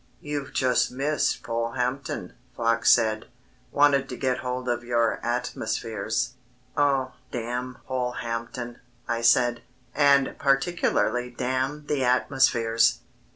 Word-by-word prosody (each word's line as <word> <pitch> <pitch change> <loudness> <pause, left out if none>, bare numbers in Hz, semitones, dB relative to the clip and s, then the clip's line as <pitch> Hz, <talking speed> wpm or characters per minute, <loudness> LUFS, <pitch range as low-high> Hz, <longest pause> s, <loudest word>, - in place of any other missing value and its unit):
"You've 145 -1 -4
just 130 -2 +2
missed 140 +4 0
Polehampton," 125 +3 -2 0.2
Fox 115 0 +3
said; 110 -1 +2 0.4
"wanted 140 -2 +3
to 125 - -6
get 130 -1 0
hold 125 0 -4
of 120 -1 -1
your 120 -1 +1
'Atmospheres.'" 120 -1 -2 0.4
"Oh, 135 -3 +2 0.2
damn 125 +1 -4
Polehampton," 120 -1 -4 0.3
I 115 -1 -1
said, 120 0 +4 0.3
"and 140 -2 +4
particularly 135 -3 +1
damn 130 +4 -2
the 145 -3 0
'Atmospheres.'" 120 -2 +3
125 Hz, 105 wpm, -26 LUFS, 120-135 Hz, 0.4 s, said